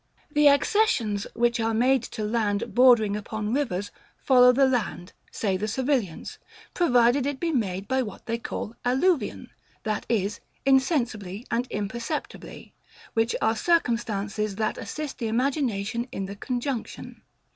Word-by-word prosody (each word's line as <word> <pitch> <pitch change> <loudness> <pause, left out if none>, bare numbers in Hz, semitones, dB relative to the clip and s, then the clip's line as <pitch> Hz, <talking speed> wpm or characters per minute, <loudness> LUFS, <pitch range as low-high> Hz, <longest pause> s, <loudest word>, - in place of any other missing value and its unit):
The 295 0 +5
accessions, 280 - +2
which 240 +1 +1
are 225 0 0
made 255 +3 +3 0.2
to 215 - -2
land, 215 0 -1
bordering 240 -5 +5
upon 210 +1 -4
rivers, 205 -8 -1 0.3
follow 250 -2 +6
the 270 +2 +4
land, 230 -8 -2 0.2
say 195 -4 -1
the 210 +3 -3
civilians, 245 - -2 0.3
provided 250 -4 +3
it 285 -2 -3
be 340 -1 -1
made 195 - -2
by 260 +2 +1
what 210 -6 -7
they 230 0 -2
call 225 - -5
alluvion, 265 +6 0 0.3
that 215 -2 -2
is, 210 -2 0 0.3
insensibly 245 - +1
and 240 +2 0
imperceptibly; 235 +8 -5 0.4
which 225 +1 +1
are 225 +1 +2
circumstances, 215 - 0
that 215 +1 -2
assist 300 -2 -6
the 230 - -2
imagination 235 -2 -1
in 195 - -4
the 200 +1 -7
conjunction. 245 +3 -4
235 Hz, 135 wpm, -26 LUFS, 210-265 Hz, 0.4 s, follow